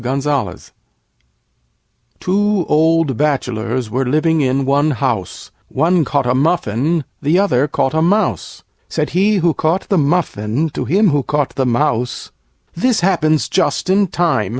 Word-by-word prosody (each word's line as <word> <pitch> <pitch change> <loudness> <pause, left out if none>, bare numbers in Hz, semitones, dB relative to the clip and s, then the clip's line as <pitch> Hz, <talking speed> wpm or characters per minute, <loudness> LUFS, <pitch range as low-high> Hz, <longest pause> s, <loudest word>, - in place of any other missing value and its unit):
Two 200 -1 0
old 160 -3 +2
Bachelors 125 -5 -2
were 130 +4 0
living 155 +4 +1
in 135 0 0
one 140 +3 +2
house; 130 -7 -3 0.2
One 165 +4 +1
caught 140 -2 0
a 125 - +1
Muffin, 150 +1 0 0.2
the 155 +4 +2
other 150 -9 +2
caught 135 -1 -1
a 160 - +1
Mouse. 200 +6 -1 0.3
Said - - -2
he 200 +4 +2
who 175 -4 +2
caught 160 +5 -1
the 195 - +2
Muffin 145 -3 -1
to 130 - -4
him 195 - +3
who 145 -1 +1
caught 145 0 -2
the 130 -2 -1
Mouse, 125 -1 -1 0.4
"This 225 +3 0
happens 155 -4 +1
just 185 0 0
in 200 +1 +3
time! 165 - 0
155 Hz, 140 wpm, -17 LUFS, 130-175 Hz, 0.4 s, him